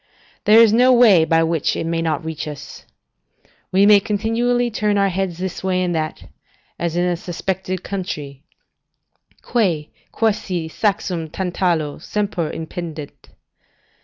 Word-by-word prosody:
There 215 +2 +7
is 225 -2 +6
no 250 +3 +5
way 220 -10 +6
by 165 0 +3
which 165 -2 0
it - - -3
may 165 0 -1
not 160 -2 -2
reach 160 -1 -5
us. 150 -2 -9 0.8
We 195 +2 +4
may 205 0 +7
continually 230 +4 0
turn 210 -1 0
our 200 0 +3
heads 190 -2 -2
this 185 0 -5
way 185 -1 +1
and 175 -1 -1
that, 155 -1 -3 0.6
as 170 -1 -2
in 175 +1 +1
a 180 -1 +1
suspected 185 +1 -4
country: 150 -8 -5 1.0
"Quae, 175 -11 0 0.2
quasi 200 -6 -1
saxum 185 -4 -1
Tantalo, 175 -5 -1
semper 195 -2 -2
impendet." 160 -2 -6
180 Hz, 135 wpm, -20 LUFS, 165-205 Hz, 1.0 s, There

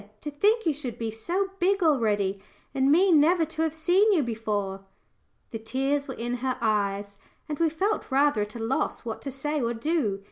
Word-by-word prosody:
to 295 - -6
think 420 +10 +2
you 320 - +2
should 270 -5 -6
be 225 -1 -3
so 350 - -2
big 390 +1 +2
already, 205 - +1 0.3
and 270 +1 +2
me 365 +5 +5
never 325 +2 +4
to 320 +1 -5
have 320 -1 +1
seen 360 +7 +3
you 325 -6 +2
before!" 210 -4 -3 0.7
The 225 - -5
tears 270 +5 -1
were 265 - -6
in 240 +2 -3
her 255 +1 -2
eyes, 200 -2 -1 0.3
and 295 -2 -4
we 330 -1 +3
felt 390 +7 -1
rather 275 -4 +3
at 210 +2 -5
a - - -6
loss 230 +2 -2
what 225 -2 -5
to 280 - -5
say 295 +3 -3
or 235 0 -1
do. 230 -6 -1
270 Hz, 200 wpm, -26 LUFS, 225-320 Hz, 0.7 s, me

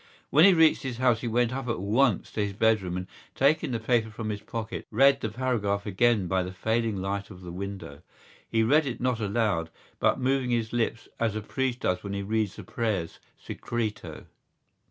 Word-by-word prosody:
When 155 +4 +7
he 200 - +8
reached 160 -1 +5
his 130 -4 -4
house 125 -3 +2
he 120 - -3
went 120 +1 +1
up 135 -1 -4
at 115 - -1
once 110 +3 +1
to 105 - -1
his 100 -1 -3
bedroom 100 -4 +1
and, 90 - -4 0.3
taking 145 +3 +2
the 120 -3 -2
paper 115 0 +1
from 110 0 -5
his 105 -1 -4
pocket, 110 0 -6
read 135 +4 +4
the 110 - -2
paragraph 105 -4 -1
again 105 0 +2
by 95 +1 +1
the 90 0 -4
failing 110 +4 -1
light 100 +1 -3
of 95 -3 -12
the 90 - -7
window. 95 -6 -7 0.5
He 115 0 +2
read 145 +6 +3
it 125 - -4
not 125 -2 0
aloud, 100 -6 0 0.3
but - - +2
moving 130 0 +1
his 115 -2 -1
lips 115 -1 -1
as 115 -2 0
a 110 - -2
priest 130 +3 -2
does 90 - 0
when 100 -1 -5
he 100 0 -3
reads 110 -1 -1
the 105 - -9
prayers 100 -4 -2 0.2
Secreto. 115 -3 -5
110 Hz, 200 wpm, -27 LUFS, 100-125 Hz, 0.5 s, he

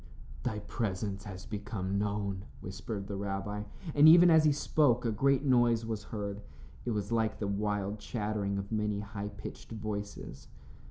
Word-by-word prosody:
"Thy 120 -4 -2
presence 100 -2 -3
has 95 -1 -8
become 100 -2 -3
known," 100 -1 -2
whispered 100 +2 -5
the 100 - -5
rabbi, 100 +1 -3 0.3
and 150 +2 +8
even 175 +1 +9
as 160 -1 +6
he 150 - +6
spoke 140 -4 +2
a 115 - +2
great 135 +5 +2
noise 120 -4 +3
was 110 -2 -4
heard. 100 -1 -4 0.4
It - - -1
was 105 -2 -2
like 110 -2 +1
the 105 - -3
wild 105 0 -1
chattering 105 -3 -2
of 100 +1 -5
many 105 -2 0
high 100 0 -5
pitched 105 +1 -9
voices. 105 -2 -5
105 Hz, 160 wpm, -31 LUFS, 100-115 Hz, 0.4 s, even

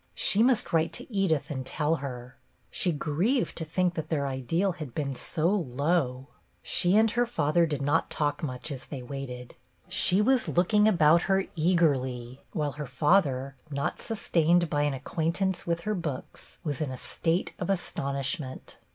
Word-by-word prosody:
She 205 - +3
must 235 -7 +3
write 165 0 +2
to 245 - -7
Edith 160 -7 +1
and 130 -2 -3
tell 155 +4 0
her; 125 -3 -7 0.4
she 180 - +1
grieved 170 - 0
to 165 - -2
think 180 +3 0
that 160 -2 -5
their 145 -3 0
ideal 140 +9 0
had 155 -8 -8
been 140 -3 -2
so 155 +5 -2
low. 140 -6 0 0.4
She 180 +3 +3
and 220 0 +4
her 240 +1 +1
father 165 -5 +2
did 145 -3 -2
not 145 +1 +1
talk 145 -1 -1
much 130 0 -4
as 135 -3 -6
they 135 -4 -7
waited; 125 -2 -7 0.3
she 185 - +3
was 255 +4 +3
looking 210 +5 +3
about 170 -5 +5
her 195 0 +3
eagerly, 135 -7 +1
while 150 -2 -1
her 150 0 -6
father, 135 -1 +2
not 140 -1 -2
sustained 175 -6 +1
by 145 - +1
an 145 -2 0
acquaintance 170 +7 -2
with 170 0 0
her 215 +4 -1
books, 160 -9 -6
was 145 -4 -3
in 150 - -1
a 130 - -5
state 165 +7 -1
of 180 - -3
astonishment. 140 -6 -3
155 Hz, 170 wpm, -28 LUFS, 135-180 Hz, 0.4 s, about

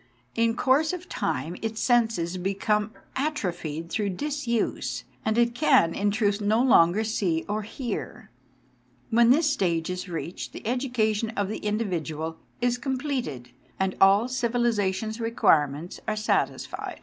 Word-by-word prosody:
In 230 0 +2
course 290 +7 +2
of 360 0 -6
time 170 - -2
its 225 0 -3
senses 225 -8 +2
become 205 +3 0 0.3
atrophied 175 - -3
through 210 -2 0
disuse, 245 +2 -2 0.2
and 220 +1 0
it 235 0 +3
can, 245 - +4
in 205 +3 +1
truth, 205 0 +1
no 210 +2 +2
longer 215 -5 +5
see 190 -7 0
or 210 +1 -1
hear. 225 - -6 0.8
When 235 +1 +5
this 300 +5 +5
stage 175 - 0
is 180 +1 -5
reached 170 +1 -5
the - - -9
education 230 -3 0
of 200 -1 0
the 215 - -4
individual 165 -7 -2 0.2
is 245 0 +1
completed, 255 - -3 0.3
and 190 -1 0
all 195 +3 +6
civilisa 240 -5 +1
tion's 220 +4 -5
requirements 170 -9 +1
are 215 - 0
satisfied. 215 +1 -2
215 Hz, 135 wpm, -26 LUFS, 185-240 Hz, 0.8 s, all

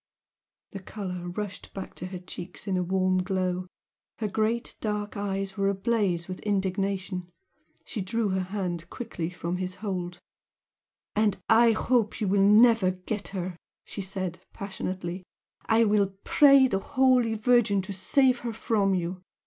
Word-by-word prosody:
The 195 - -6
colour 185 -3 -6
rushed 205 +2 -6
back 195 - -6
to 180 - -5
her 185 0 -6
cheeks 180 +2 -9
in 190 - 0
a 180 - +1
warm 185 +1 +1
glow 185 -1 -1 0.5
her 215 - -1
great 220 +3 -1
dark 210 -1 -2
eyes 195 -1 -2
were 195 0 +2
ablaze 195 -4 0
with 185 0 -6
indignation. 190 -2 -1 0.6
She 215 - -4
drew 210 +3 -1
her 190 0 0
hand 180 -4 -4
quickly 175 -9 -4
from 175 0 -4
his 185 0 -3
hold. 180 -3 -4 1.0
"And 210 -1 +2
I 230 0 +6
hope 230 -2 +1
you 210 - 0
will 195 +1 +3
never 210 0 +6
get 185 +3 -4
her!" 185 -2 -4 0.3
she 200 - -6
said, 185 -2 -4
passionately 185 -2 -4 0.5
"I 225 +1 +5
will 205 -3 +2
pray 275 -3 +6
the 195 -6 0
Holy 250 0 +3
Virgin 220 -3 +3
to 200 +1 -5
save 250 +7 +3
her 235 -2 -4
from 205 -3 +1
you! 180 +1 -3
195 Hz, 150 wpm, -27 LUFS, 185-215 Hz, 1.0 s, I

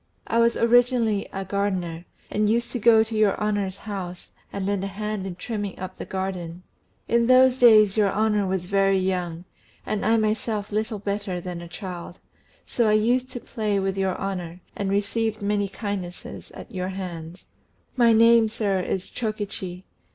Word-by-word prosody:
I 230 - +1
was 235 0 +3
originally 235 -3 +3
a 195 0 -4
gardener, 185 -4 -2 0.3
and 210 0 +1
used 235 +2 0
to 245 - -2
go 225 0 +6
to 225 0 -6
your 215 -2 +2
honour's 205 -3 -1
house 190 -4 -6 0.2
and 200 -1 -3
lend 200 -1 -1
a - - -1
hand 210 0 -4
in 180 - -6
trimming 205 0 -4
up 185 0 -7
the - - -5
garden. 185 -2 -4 0.4
In 235 0 +2
those 255 0 +6
days 215 -5 +6
your 205 -2 +3
honour 210 -2 +1
was 185 -1 -1
very 195 +1 +2
young, 180 -2 -2 0.4
and 210 - -2
I 225 +1 +3
myself 215 -1 -1
little 215 +1 -1
better 200 -2 -3
than 175 -1 -6
a 170 - -8
child; 175 0 -7
and - - -31 0.4
so 235 -2 +1
I - - +4
used 245 +4 +2
to 245 - -4
play 210 -4 -2
with 195 0 -1
your 190 -1 0
honour, 180 -3 -4
and 200 -1 -2
received 215 +2 0
many 205 0 +1
kindnesses 195 -3 -6
at - - -10
your 185 -1 -2
hands. 180 -2 -7 0.5
My 235 -2 +5
name, 230 0 +6
sir, 205 -3 -1
is 185 0 -2
Chokichi. 205 -5 -4
200 Hz, 175 wpm, -24 LUFS, 190-220 Hz, 0.5 s, go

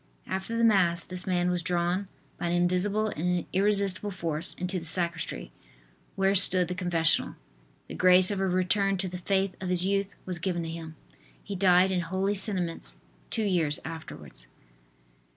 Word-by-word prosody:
After 190 +5 -3
the 230 - +1
Mass 180 -6 +3
this 180 0 -5
man 180 -1 +1
was 180 -1 -1
drawn 175 +3 0 0.3
by 175 - -2
an 170 - 0
invisible 185 +5 +1
and 180 0 -1
irresistible 200 0 +2
force 165 -3 -2
into 180 +1 -2
the 165 - -9
sacristy, 170 0 +1 0.6
where 195 0 +2
stood 185 -2 +4
the - - -1
confessional. 175 -3 +1 0.5
The - - -8
grace 185 +1 +5
of 200 - -2
a 195 - +1
return 190 +2 +1
to 185 +1 -2
the 180 0 -6
faith 190 0 0
of 185 - -3
his 180 0 +2
youth 195 0 0
was 180 -2 -5
given 175 -1 -2
to 165 - -5
him. 160 -1 -7 0.5
He 200 - -5
died 185 0 +4
in 185 - +1
holy 190 +4 -1
sentiments 190 -4 -1 0.3
two 225 - -1
years 170 -7 +1
afterwards. 160 - -7
180 Hz, 170 wpm, -28 LUFS, 175-195 Hz, 0.6 s, grace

